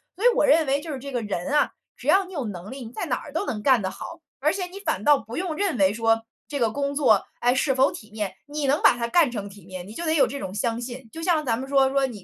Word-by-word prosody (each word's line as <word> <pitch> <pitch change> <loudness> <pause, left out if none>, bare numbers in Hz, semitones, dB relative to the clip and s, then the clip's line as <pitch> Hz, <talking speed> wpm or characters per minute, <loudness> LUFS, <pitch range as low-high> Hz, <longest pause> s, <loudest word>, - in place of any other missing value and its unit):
所 385 - -7
以 - - +7
我 - - +4
认 310 0 +4
为 275 +1 +2
就 320 - -6
是 265 - -5
这 280 +2 -7
个 245 -3 -2
人 195 -4 -3
啊， 295 0 +3 0.3
只 - - -10
要 385 0 +5
你 375 - -12
有 280 -8 -3
能 190 -1 -6
力， 260 -2 -7
你 225 - -9
在 - - -4
哪 - - 0
都 - - 0
能 210 -2 -3
干 260 -5 +5
得 190 - -1
好。 335 - -8 0.2
而 300 +3 +2
且 380 -2 -2
你 380 +2 -10
反 205 - -1
倒 295 -1 +6
不 225 0 -8
用 350 -2 -2
认 370 -7 0
为 190 -1 +4
说 225 +1 +2 0.3
这 285 -2 -4
个 230 - +3
工 280 +4 -2
作， 265 -9 +3
哎， 245 +1 +3
是 270 +1 +2
否 265 +1 +3
体 215 0 -11
面。 210 -3 -4
你 290 -1 -3
能 285 +3 +3
把 - - +7
它 235 -1 -2
干 305 0 +4
成 205 -4 -5
体 200 0 -15
面， 185 -1 -8
你 215 - -10
就 340 - -4
得 315 - +2
有 305 - +4
这 280 - -5
种 190 -6 -5
相 230 +2 -1
信。 245 -1 -7
就 325 - -7
像 330 -3 +2
咱 235 -5 0
们 265 - -5
说 270 -1 +4
说 275 0 +2
你 220 -7 -7
265 Hz, 330 characters per minute, -25 LUFS, 220-300 Hz, 0.3 s, 以